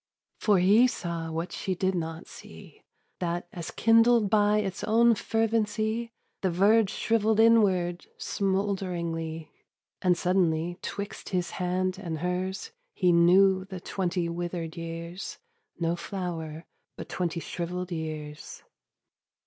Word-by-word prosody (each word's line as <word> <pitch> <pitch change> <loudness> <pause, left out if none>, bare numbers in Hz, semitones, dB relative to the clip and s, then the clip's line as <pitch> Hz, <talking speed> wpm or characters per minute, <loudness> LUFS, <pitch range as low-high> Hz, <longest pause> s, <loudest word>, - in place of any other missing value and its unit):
For 205 -3 +3
he 205 +7 +6
saw 170 -7 -4
what 165 +3 -3
she 190 - -3
did 190 +1 0
not 165 -2 -4
see, - - -13 0.4
That 175 0 -2
as 170 -2 -6
kindled 230 -2 +4
by 210 -1 +4
its 195 -3 -2
own 230 +2 +5
fervency 225 +1 0 0.3
The 190 - +1
verge 200 +4 +4
shrivelled 220 0 +1
inward 190 -6 +3
smoulderingly: 175 -5 -2 0.5
And 180 -2 +3
suddenly 175 -1 +1
'twixt 200 0 -6
his 180 -2 -1
hand 185 +1 -1
and 170 -5 -4
hers 185 - -3 0.2
He 180 -2 +3
knew 185 +3 +5
the 190 -2 -7
twenty 180 -1 -2
withered 170 -1 -4
years 170 +2 -6 0.4
No 170 0 +1
flower, 170 -4 -5 0.3
but - - -7
twenty 175 -2 -2
shrivelled 180 +2 -4
years. 155 -2 -6
180 Hz, 120 wpm, -28 LUFS, 170-205 Hz, 0.5 s, he